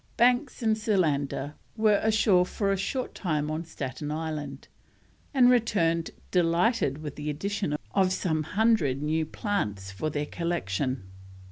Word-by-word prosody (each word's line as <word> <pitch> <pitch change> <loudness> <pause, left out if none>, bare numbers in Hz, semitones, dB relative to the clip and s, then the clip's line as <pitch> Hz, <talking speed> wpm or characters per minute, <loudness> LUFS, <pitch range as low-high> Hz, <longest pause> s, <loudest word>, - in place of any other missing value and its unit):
Banks 250 +2 +3
and 220 -1 +3
Solander 150 -9 0 0.2
were 215 -2 +4
ashore 215 -4 +4
for 195 +2 -1
a - - +2
short 250 +7 -3
time 155 -5 -1
on 155 +2 -2
Staten 140 -2 -5
Island, 150 -3 -4 0.6
and 260 -3 +5
returned 190 -9 +2 0.2
delighted 175 - +2
with 150 -2 -6
the 150 0 -3
addition 185 +1 -2 0.2
of 190 -2 +3
some 160 -4 0
hundred 160 - +2
new 155 +1 0
plants 105 - -2
for 100 +11 -3
their 150 0 -2
collection. 135 - -2
165 Hz, 135 wpm, -27 LUFS, 150-210 Hz, 0.6 s, and